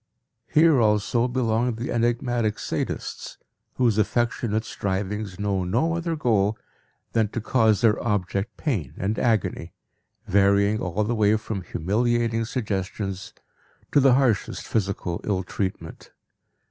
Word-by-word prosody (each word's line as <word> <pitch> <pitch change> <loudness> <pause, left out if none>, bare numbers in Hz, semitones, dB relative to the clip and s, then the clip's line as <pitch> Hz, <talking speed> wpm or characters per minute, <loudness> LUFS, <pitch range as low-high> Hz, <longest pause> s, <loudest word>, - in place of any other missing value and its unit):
Here 155 -4 +4
also 110 +3 +2
belong 120 -1 0
the 115 +2 -4
enigmatic 120 -2 0
sadists, - - -4 0.4
whose 115 -4 +2
affectionate 115 0 0
strivings 100 0 -3
know 100 -2 0
no 120 - +1
other 170 -1 -2
goal 110 -7 +1 0.6
than 110 -2 +2
to 115 - -4
cause 110 -2 +2
their 110 -3 +3
object 100 -1 -1
pain 100 - -2
and 105 +3 -1
agony, 105 -7 0 0.5
varying 100 +2 +3
all 90 +4 -1
the 110 +3 -1
way 105 -1 +3
from 110 -2 -5
humiliating 115 +6 0
suggestions 100 -4 -4 0.6
to - - +5
the 135 -2 +5
harshest 125 -6 0
physical 95 -4 -2
ill 95 -3 -1
treatment. 95 -2 -5
110 Hz, 120 wpm, -24 LUFS, 100-120 Hz, 0.6 s, to